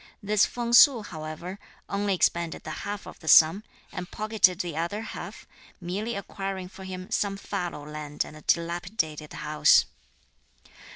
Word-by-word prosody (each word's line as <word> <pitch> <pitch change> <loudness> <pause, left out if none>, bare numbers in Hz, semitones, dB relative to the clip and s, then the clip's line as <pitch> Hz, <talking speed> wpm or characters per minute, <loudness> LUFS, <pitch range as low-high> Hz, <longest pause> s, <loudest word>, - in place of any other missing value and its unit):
This 210 0 +3
Feng 235 -1 -3
Su, 245 -2 +8
however, 160 +2 -7 0.3
only 200 -1 0
expended 170 -2 0
the - - -6 0.2
half 205 -1 -5
of - - -11
the 160 - -13
sum, 160 +6 +7 0.3
and 180 -1 -6
pocketed 210 -4 +2
the 170 -3 -5
other 170 +6 -2
half, - - -8 0.3
merely 200 +6 -3
acquiring 195 -2 -5
for 190 0 -11
him 185 0 -7
some 200 -1 0
fallow 175 -7 -5
land 150 -1 -4
and - - -11
a 155 - -12
dilapidated 170 -3 -1
house. 150 - +4
180 Hz, 150 wpm, -27 LUFS, 160-205 Hz, 0.3 s, Su